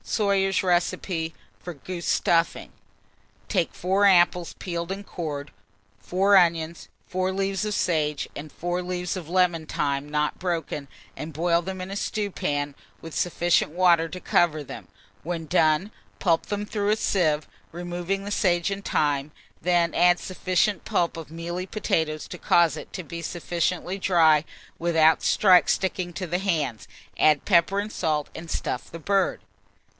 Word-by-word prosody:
SOYER'S 195 Hz, -3 st, +1 dB
RECIPE 175 Hz, -2 st, 0 dB, 0.3 s
FOR 175 Hz, -2 st, -8 dB
GOOSE 175 Hz, +4 st, -6 dB
STUFFING. 165 Hz, 0 st, +1 dB, 0.8 s
Take 180 Hz, -6 st, 0 dB
4 190 Hz, +3 st, +2 dB
apples, 175 Hz, -2 st, +3 dB
peeled 170 Hz, -1 st, -4 dB
and 200 Hz, +1 st, -5 dB
cored, 150 Hz, -6 st, -5 dB, 0.5 s
4 190 Hz, -, +2 dB
onions, 170 Hz, -2 st, +2 dB, 0.2 s
4 185 Hz, 0 st, -1 dB
leaves 195 Hz, +1 st, -1 dB
of 210 Hz, -1 st, -1 dB
sage, 150 Hz, -4 st, 0 dB
and 150 Hz, +1 st, -8 dB
4 175 Hz, +1 st, -3 dB
leaves 180 Hz, 0 st, -3 dB
of 170 Hz, -4 st, -7 dB
lemon 175 Hz, -3 st, +2 dB
thyme 140 Hz, 0 st, -2 dB
not 150 Hz, 0 st, -1 dB
broken, 165 Hz, -5 st, -3 dB, 0.3 s
and 155 Hz, +2 st, -6 dB
boil 170 Hz, +2 st, +1 dB
them 190 Hz, +2 st, -6 dB
in 185 Hz, +1 st, -6 dB
a -, -, -4 dB
stewpan 145 Hz, -10 st, -2 dB, 0.2 s
with 165 Hz, -1 st, -10 dB
sufficient 175 Hz, -2 st, +1 dB
water 170 Hz, -2 st, +4 dB
to 185 Hz, -, -7 dB
cover 155 Hz, -4 st, +2 dB
them; -, -, -9 dB, 0.3 s
when 165 Hz, -1 st, -4 dB
done, 160 Hz, +4 st, +2 dB, 0.3 s
pulp 165 Hz, -3 st, +1 dB
them 205 Hz, 0 st, -2 dB
through 205 Hz, -1 st, -1 dB
a 215 Hz, -, +3 dB
sieve, 155 Hz, -8 st, +1 dB, 0.2 s
removing 175 Hz, +3 st, -3 dB
the 205 Hz, -, -5 dB
sage 175 Hz, -2 st, +1 dB
and 195 Hz, 0 st, -4 dB
thyme; 145 Hz, -3 st, 0 dB, 0.3 s
then 175 Hz, -1 st, +2 dB
add 175 Hz, 0 st, +4 dB
sufficient 185 Hz, +2 st, 0 dB
pulp 170 Hz, -1 st, 0 dB
of 160 Hz, -2 st, -8 dB
mealy 175 Hz, +3 st, -5 dB
potatoes 160 Hz, -8 st, -1 dB
to 180 Hz, -, -8 dB
cause 170 Hz, -4 st, +3 dB
it -, -, -9 dB
to 185 Hz, -, -6 dB
be 170 Hz, +2 st, -7 dB
sufficiently 175 Hz, +3 st, -2 dB
dry 160 Hz, -5 st, +4 dB, 0.4 s
without 160 Hz, -2 st, +4 dB
sticking 185 Hz, -1 st, +3 dB
to 185 Hz, +2 st, -5 dB
the 175 Hz, +1 st, -1 dB
hand; 160 Hz, -, -1 dB, 0.3 s
add 150 Hz, -2 st, +4 dB
pepper 190 Hz, +1 st, +3 dB
and 210 Hz, +1 st, -3 dB
salt, 150 Hz, -2 st, -1 dB
and 165 Hz, 0 st, -9 dB
stuff -, -, -3 dB
the 165 Hz, -, -7 dB
bird. 195 Hz, +3 st, +1 dB
175 Hz, 150 wpm, -25 LUFS, 160-185 Hz, 0.8 s, water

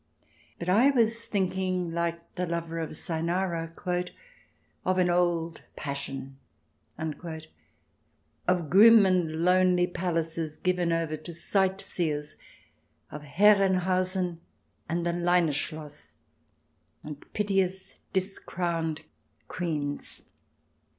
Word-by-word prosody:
But 170 Hz, -, -6 dB
I 220 Hz, +9 st, +5 dB
was 230 Hz, -3 st, +3 dB
thinking, 185 Hz, -3 st, -1 dB
like 170 Hz, 0 st, -3 dB
the 180 Hz, 0 st, -2 dB
lover 165 Hz, 0 st, -3 dB
of 160 Hz, -1 st, -4 dB
Cynara, 170 Hz, 0 st, -1 dB, 1.1 s
"of 185 Hz, 0 st, +1 dB
an 180 Hz, -1 st, +3 dB
old 170 Hz, -2 st, 0 dB
passion," 135 Hz, -1 st, -5 dB, 0.6 s
of 155 Hz, -2 st, -4 dB
grim 180 Hz, +4 st, +1 dB
and 180 Hz, -4 st, +2 dB
lonely 180 Hz, -1 st, +4 dB
palaces 165 Hz, -3 st, -2 dB
given 180 Hz, -2 st, 0 dB
over 165 Hz, -2 st, 0 dB
to 155 Hz, +3 st, -9 dB
sightseers, 170 Hz, -5 st, -1 dB, 0.8 s
of 150 Hz, -, -7 dB
Herrenhausen 185 Hz, 0 st, +3 dB, 0.5 s
and 170 Hz, +1 st, -1 dB
the 170 Hz, -, +1 dB
Leine 175 Hz, -2 st, +2 dB
Schloss, 150 Hz, 0 st, -5 dB, 0.9 s
and 150 Hz, -1 st, -8 dB
piteous 190 Hz, -2 st, -1 dB
Discrowned 175 Hz, -4 st, -2 dB, 0.4 s
Queens. 150 Hz, -5 st, -3 dB
175 Hz, 90 wpm, -28 LUFS, 160-185 Hz, 1.1 s, I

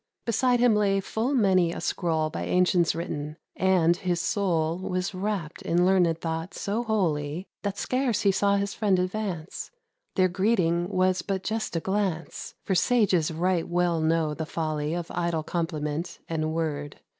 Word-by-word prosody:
Beside 245 Hz, +2 st, +2 dB
him 240 Hz, -2 st, +5 dB
lay 200 Hz, -2 st, +2 dB
full 225 Hz, +7 st, -1 dB
many 185 Hz, -7 st, +3 dB
a -, -, -5 dB
scroll 160 Hz, -3 st, 0 dB
By -, -, -4 dB
ancients 180 Hz, -2 st, +3 dB
written; 155 Hz, -2 st, -4 dB, 0.2 s
and 180 Hz, -3 st, +3 dB
his 180 Hz, -2 st, -1 dB
soul 170 Hz, -4 st, 0 dB
Was 185 Hz, +1 st, -2 dB
wrapt 185 Hz, -4 st, -3 dB
in 175 Hz, +1 st, +2 dB
learned 180 Hz, -3 st, +3 dB
thought 165 Hz, +2 st, -4 dB
so 210 Hz, +4 st, -1 dB
wholly, 170 Hz, -7 st, -1 dB, 0.2 s
That 200 Hz, -1 st, -3 dB
scarce 255 Hz, -2 st, 0 dB
he 200 Hz, -, +4 dB
saw 200 Hz, +1 st, +2 dB
his 200 Hz, 0 st, -1 dB
friend 205 Hz, -4 st, +2 dB
advance: 185 Hz, -3 st, -3 dB, 0.5 s
Their 185 Hz, -2 st, +4 dB
greeting 180 Hz, -2 st, +1 dB
was 185 Hz, -2 st, +2 dB
but 190 Hz, +1 st, -3 dB
just 220 Hz, -4 st, -2 dB
a -, -, +2 dB
glance; 190 Hz, -2 st, -2 dB
For 195 Hz, -, 0 dB
sages 190 Hz, -5 st, +3 dB
right 170 Hz, +1 st, 0 dB
well 175 Hz, -2 st, +1 dB
know 160 Hz, -1 st, +1 dB
the 160 Hz, +1 st, -5 dB
folly 155 Hz, -1 st, -2 dB
Of 175 Hz, -1 st, -4 dB
idle 170 Hz, -2 st, -1 dB
compliment 165 Hz, 0 st, -3 dB
and 155 Hz, -1 st, -1 dB
word. 150 Hz, -3 st, -3 dB
180 Hz, 160 wpm, -26 LUFS, 165-200 Hz, 0.5 s, him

